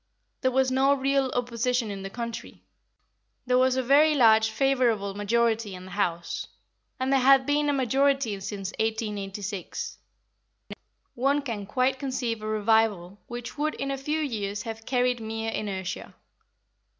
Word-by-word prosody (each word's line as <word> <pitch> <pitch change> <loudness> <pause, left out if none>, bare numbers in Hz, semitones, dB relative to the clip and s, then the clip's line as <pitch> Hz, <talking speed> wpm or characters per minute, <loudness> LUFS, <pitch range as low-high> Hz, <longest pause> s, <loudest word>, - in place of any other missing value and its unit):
There 260 - +3
was 260 0 +2
no 270 +2 +4
real 275 0 +1
opposition 245 -1 0
in 195 -1 -6
the 195 - -5
country; 235 +2 -7 0.8
there 250 0 +3
was 260 0 +3
a 260 - 0
very 295 +4 +5
large 220 -4 +5
favourable 235 -5 +1
majority 220 0 0
in 180 0 -10
the 185 - -11
House, 175 -3 -2 0.5
and 260 +1 +1
there 270 - +5
had 265 0 +6
been 290 +1 +1
a - - +2
majority 270 -4 +1
since 195 0 -5
1886. 205 -3 -3 1.1
One 275 +4 +1
can 215 -7 -4
quite 255 +4 +1
conceive 250 -5 -2
a 215 - -5
revival 210 -3 +1
which 240 +3 -7
would 305 +1 0
in 275 0 -3
a - - -1
few 300 +4 -2
years 205 -7 -3
have 225 -1 -7
carried 250 -1 +1
mere 225 0 -3
inertia. 190 -4 -4
235 Hz, 150 wpm, -27 LUFS, 210-265 Hz, 1.1 s, had